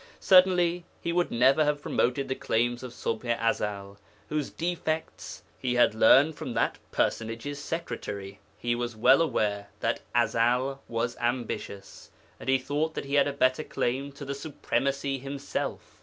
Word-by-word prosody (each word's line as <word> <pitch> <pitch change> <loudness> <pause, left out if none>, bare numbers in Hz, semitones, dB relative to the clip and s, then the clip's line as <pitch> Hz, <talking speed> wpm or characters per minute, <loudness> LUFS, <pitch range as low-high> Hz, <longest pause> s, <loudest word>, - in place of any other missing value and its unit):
Certainly 180 -2 +5 0.2
he 170 - -2
could 175 0 +1
never 130 +6 +4
have 150 0 0
promoted 135 +3 0
the 130 - 0
claims 120 -1 0
of 125 -1 -7
Ṣubḥ 120 0 -2
i 115 0 +3
Ezel, 100 -1 -5 0.3
whose 150 -2 -1
defects 160 -2 -3 0.2
he 125 -2 -1
had 120 -3 +4
learned 135 +8 +6
from - - -6
that - - 0
personage's 115 +6 -2
secretary. 110 - -5 0.2
He 120 0 -1
was 120 -1 -3
well 130 +7 +5
aware 105 -10 0
that - - 0
Ezel 125 +4 +2
was 115 +1 -2
ambitious, 120 -5 -4 0.3
and - - -5
he 135 - +5
thought 150 +4 -2
that - - -4
he 140 - -6
had 145 0 +4
a - - 0
better 130 +1 +2
claim 135 +2 -2
to 140 0 -9
the 140 - -3
supremacy 140 -1 -2
himself. 140 +1 -5
130 Hz, 155 wpm, -28 LUFS, 120-145 Hz, 0.3 s, learned